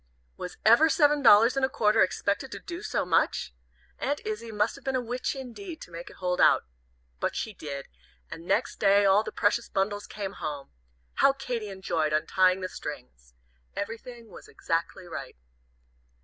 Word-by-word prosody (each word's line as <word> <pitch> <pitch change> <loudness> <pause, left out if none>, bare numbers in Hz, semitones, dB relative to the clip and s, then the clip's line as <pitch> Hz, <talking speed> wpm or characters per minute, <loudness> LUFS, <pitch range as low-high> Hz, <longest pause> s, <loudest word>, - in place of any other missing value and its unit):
Was 180 - -7
ever 235 +9 +7
seven 295 -2 +4
dollars 230 0 +7
and 270 - 0
a 265 - +3
quarter 210 -5 +3
expected 200 +6 0
to - - -6
do 345 -1 -7
so - - -1
much? 165 - +1 0.5
Aunt 285 +2 -1
Izzie 215 +2 -4
must 210 +1 +1
have 275 - -14
been 270 0 -1
a - - +2
witch, 245 +2 -3
indeed, 270 - -8
to - - -11
make 170 +1 -8
it - - -14
hold 180 -1 -1
out. - - +5 0.6
But - - -1
she 220 - -3
did, 140 -6 -7 0.4
and 165 - -9
next - - 0
day 200 0 +5
all 195 +1 +5
the - - -6
precious 225 +3 +1
bundles 205 +1 -1
came 200 -2 -5
home. 145 -3 -5 0.5
How 275 - +6
Katy 245 -6 -4
enjoyed 170 -5 -1
untying 185 +4 +3
the 185 - -2
strings! 60 - -9 0.4
Everything 230 +2 -6
was - - -12
exactly 165 +2 -3
right. 175 - -7
205 Hz, 175 wpm, -28 LUFS, 180-245 Hz, 0.6 s, ever